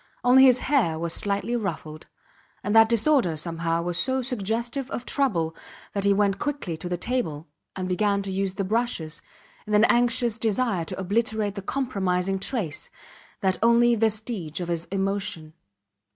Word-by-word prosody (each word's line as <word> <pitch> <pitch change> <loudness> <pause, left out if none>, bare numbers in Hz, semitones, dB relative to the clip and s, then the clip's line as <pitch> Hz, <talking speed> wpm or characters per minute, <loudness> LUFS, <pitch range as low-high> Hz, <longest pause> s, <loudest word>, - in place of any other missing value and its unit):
Only 260 +2 +7
his 255 -1 +5
hair 245 - +1
was 165 0 -3
slightly 200 +4 -1
ruffled, 165 -8 -5 0.6
and 205 +2 -1
that 225 0 +7
disorder, 230 - +2
somehow, 165 +1 -2
was 175 0 -1
so 260 +5 +1
suggestive 240 +2 -2
of 245 - -5
trouble 170 - 0 0.4
that 200 -1 -1
he 200 - +4
went 200 -1 +2
quickly 285 - -3
to 175 - -6
the 175 - -1
table, 175 -9 -2 0.3
and 185 -1 -3
began 200 +2 +1
to 195 - -3
use 190 0 -1
the 195 - -1
brushes, 190 -7 -1 0.5
in 210 - +1
an 210 - +5
anxious 240 -1 +2
desire 220 -5 0
to - - -5
obliterate 210 +1 -1
the 200 - -6
compromising 195 -6 -1
trace, 190 - -3 0.5
that 190 -2 +1
only 235 +1 +5
vestige 215 -7 -1
of 175 -1 -4
his 170 -1 -2
emotion. 195 -5 -2
200 Hz, 160 wpm, -25 LUFS, 175-235 Hz, 0.6 s, Only